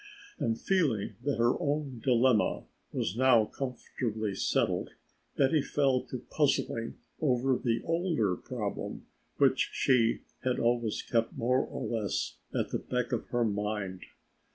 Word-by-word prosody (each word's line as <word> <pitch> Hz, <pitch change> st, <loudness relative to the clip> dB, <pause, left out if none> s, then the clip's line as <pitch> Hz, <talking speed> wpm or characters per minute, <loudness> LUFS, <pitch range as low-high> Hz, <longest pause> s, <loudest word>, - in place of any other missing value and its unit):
And 115 Hz, 0 st, 0 dB
feeling 145 Hz, -, +1 dB
that 145 Hz, -1 st, 0 dB
her 120 Hz, +1 st, +2 dB
own 145 Hz, -4 st, -1 dB
dilemma 125 Hz, -2 st, +3 dB, 0.3 s
was 85 Hz, -, -2 dB
now 125 Hz, -3 st, +5 dB
comfortably 110 Hz, -4 st, -3 dB
settled, -, -, 0 dB, 0.5 s
Betty 140 Hz, +2 st, +4 dB
fell 135 Hz, -2 st, +2 dB
to 130 Hz, -, -5 dB
puzzling 125 Hz, -4 st, 0 dB, 0.2 s
over 130 Hz, -2 st, +2 dB
the 115 Hz, -2 st, 0 dB
older 165 Hz, -, +1 dB
problem -, -, -5 dB, 0.3 s
which -, -, +3 dB
she 120 Hz, -4 st, +3 dB, 0.2 s
had 130 Hz, -1 st, +1 dB
always 120 Hz, -2 st, +1 dB
kept 115 Hz, -1 st, 0 dB
more 125 Hz, +3 st, +2 dB
or -, -, -5 dB
less 110 Hz, -3 st, -2 dB
at -, -, -1 dB
the -, -, 0 dB
back 125 Hz, -1 st, -2 dB
of 120 Hz, -, -2 dB
her 120 Hz, -1 st, +1 dB
mind. 105 Hz, -3 st, -2 dB
120 Hz, 130 wpm, -30 LUFS, 115-135 Hz, 0.5 s, now